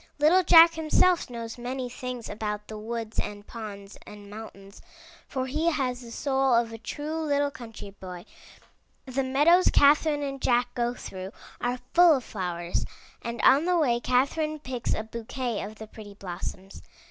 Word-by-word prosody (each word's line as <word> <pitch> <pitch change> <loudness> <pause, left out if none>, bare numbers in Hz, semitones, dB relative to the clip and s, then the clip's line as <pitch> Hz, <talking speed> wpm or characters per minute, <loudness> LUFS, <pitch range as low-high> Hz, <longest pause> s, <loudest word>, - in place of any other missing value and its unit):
Little 310 +6 +5
Jack 335 -1 +8
himself 325 +2 +2
knows 230 -1 -7
many 250 +1 -3
things 250 -1 -6
about 210 -1 -4
the 215 - -6
woods 225 0 -5
and 205 0 -4
ponds 205 -3 -9
and 205 -1 -11
mountains, 200 -2 -11 0.5
for 260 -2 -2
he 305 +6 -1
has 255 -5 -1
the 240 - -10
soul 265 0 +1
of 230 -1 +1
a 225 - -8
true 300 +7 -4
little 285 -2 +1
country 225 -5 -10
boy. 180 -3 -9 0.8
The 270 0 -1
meadows 295 +8 +4
Catherine 290 +1 +4
and 275 -1 -4
Jack 245 0 +2
go 240 -1 -1
through 190 -2 -8 0.3
are 245 +1 0 0.2
full 345 -2 +7
of 260 - -3
flowers, 175 -4 -3 0.4
and 235 0 -5
on 280 +5 +6
the 360 0 +2
way 245 -7 +2
Catherine 280 +6 +1
picks 255 -5 -3
a 215 - -3
bouquet 230 +1 -4
of 210 +2 -7
the 220 - -9
pretty 210 -2 -12
blossoms. 190 0 -7
245 Hz, 165 wpm, -27 LUFS, 215-285 Hz, 0.8 s, Jack